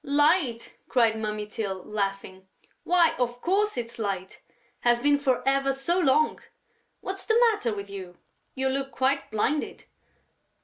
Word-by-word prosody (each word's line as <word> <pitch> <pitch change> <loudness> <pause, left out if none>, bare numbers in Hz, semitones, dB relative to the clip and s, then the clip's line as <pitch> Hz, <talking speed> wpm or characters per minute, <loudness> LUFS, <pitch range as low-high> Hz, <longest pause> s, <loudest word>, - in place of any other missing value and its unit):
"Light!" 290 -4 +2 0.2
cried 235 -2 +3
Mummy 210 -1 -3
Tyl, 200 -3 -4
laughing. 195 -2 -4 0.4
"Why, 345 -2 +4
of 245 0 -1
course, 400 +6 +1
it's 235 0 -5
light.... 195 -3 -4 0.4
Has 240 0 +3
been 285 +2 +3
for 265 -2 0
ever 275 0 +2
so 305 +7 0
long!... 305 -1 +3 0.6
What's 385 0 -5
the 445 +1 +3
matter 255 - -2
with 200 0 -6
you?... 185 -3 -9 0.4
You 265 0 0
look 270 0 -2
quite 275 +1 0
blinded...." 250 +8 -1
255 Hz, 140 wpm, -26 LUFS, 210-290 Hz, 0.6 s, Why